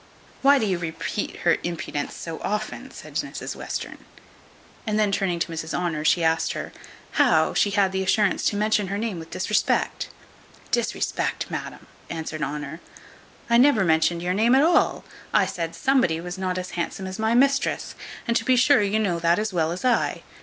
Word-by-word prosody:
"Why 280 Hz, +1 st, +6 dB
do 230 Hz, -, +1 dB
you 185 Hz, -4 st, 0 dB
repeat 160 Hz, -2 st, -4 dB
her -, -, +3 dB
impudence 165 Hz, -4 st, -4 dB
so 165 Hz, -1 st, -6 dB
often?" 210 Hz, +1 st, -3 dB
said -, -, -8 dB
Mrs -, -, -4 dB
Western. -, -, -5 dB, 0.9 s
And 210 Hz, 0 st, +1 dB
then 210 Hz, -2 st, +2 dB
turning 190 Hz, -3 st, 0 dB
to 170 Hz, 0 st, -2 dB
Mrs 160 Hz, 0 st, -4 dB
Honour, 170 Hz, -4 st, -1 dB
she 170 Hz, +1 st, +3 dB
asked 160 Hz, 0 st, +2 dB
her -, -, -6 dB, 0.5 s
"How -, -, +4 dB
she 205 Hz, -, +3 dB
had 200 Hz, -2 st, +2 dB
the 190 Hz, 0 st, -1 dB
assurance 195 Hz, +1 st, +2 dB
to -, -, +2 dB
mention 210 Hz, -1 st, +1 dB
her 200 Hz, +2 st, -2 dB
name 210 Hz, -5 st, -3 dB
with 160 Hz, -, -10 dB
disrespect?" 210 Hz, +3 st, 0 dB, 0.6 s
"Disrespect, 240 Hz, -2 st, -1 dB
madam!" -, -, -6 dB, 0.2 s
answered 160 Hz, -1 st, -5 dB
Honour; 150 Hz, +2 st, -4 dB, 0.7 s
"I 235 Hz, 0 st, +4 dB
never 250 Hz, -6 st, +5 dB
mentioned 165 Hz, +1 st, +2 dB
your 180 Hz, +1 st, 0 dB
name 225 Hz, +6 st, +4 dB
at 270 Hz, -, +5 dB
all: 340 Hz, +2 st, +3 dB, 0.3 s
I -, -, +5 dB
said 165 Hz, -1 st, -4 dB
somebody 255 Hz, -12 st, +2 dB
was 175 Hz, +1 st, -6 dB
not 185 Hz, -1 st, -2 dB
as 185 Hz, 0 st, -4 dB
handsome 175 Hz, +2 st, -3 dB
as 190 Hz, +2 st, -6 dB
my 220 Hz, +1 st, +2 dB
mistress, 275 Hz, +2 st, +2 dB, 0.3 s
and 235 Hz, -, +1 dB
to -, -, -2 dB
be 255 Hz, -, +3 dB
sure 260 Hz, 0 st, +5 dB
you 205 Hz, +1 st, +1 dB
know 190 Hz, -6 st, 0 dB
that 170 Hz, +1 st, +3 dB
as 215 Hz, -1 st, -2 dB
well 165 Hz, -2 st, +1 dB
as 180 Hz, +7 st, -5 dB
I." 250 Hz, -2 st, +1 dB
190 Hz, 185 wpm, -24 LUFS, 170-220 Hz, 0.9 s, Why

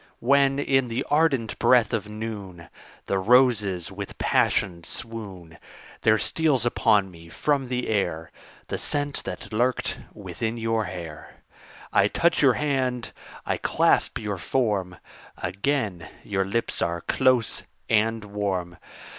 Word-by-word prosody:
When, 135 Hz, +1 st, +3 dB
in 135 Hz, -2 st, +2 dB
the 115 Hz, 0 st, -2 dB
ardent 145 Hz, -7 st, +2 dB
breath 120 Hz, -4 st, +4 dB
of 105 Hz, -2 st, -2 dB
noon, 100 Hz, -7 st, -7 dB, 0.4 s
The 95 Hz, -, 0 dB
roses 105 Hz, -5 st, +3 dB
with 100 Hz, +1 st, -7 dB
passion 85 Hz, -4 st, +1 dB
swoon; 95 Hz, -9 st, -7 dB, 0.4 s
There 110 Hz, 0 st, +4 dB
steals 145 Hz, 0 st, +1 dB
upon 105 Hz, -5 st, +3 dB
me 85 Hz, -1 st, -14 dB
from 135 Hz, -, 0 dB
the 125 Hz, 0 st, -2 dB
air 80 Hz, -6 st, -1 dB, 0.4 s
The -, -, -2 dB
scent 145 Hz, -1 st, -1 dB
that -, -, -6 dB
lurked 120 Hz, +3 st, 0 dB
within 115 Hz, +1 st, -4 dB
your 115 Hz, -1 st, 0 dB
hair; 85 Hz, -5 st, -8 dB, 0.6 s
I -, -, +5 dB
touch -, -, +2 dB
your -, -, +6 dB
hand, 130 Hz, -4 st, -1 dB, 0.3 s
I -, -, 0 dB
clasp -, -, +2 dB
your 105 Hz, -3 st, -4 dB
form 100 Hz, -4 st, 0 dB, 0.4 s
Again 100 Hz, -, -2 dB
your 95 Hz, -2 st, -1 dB
lips 110 Hz, +4 st, -2 dB
are 85 Hz, 0 st, -1 dB
close 125 Hz, +3 st, +2 dB, 0.3 s
and 110 Hz, 0 st, +1 dB
warm. 95 Hz, -4 st, -3 dB
110 Hz, 130 wpm, -25 LUFS, 95-125 Hz, 0.6 s, your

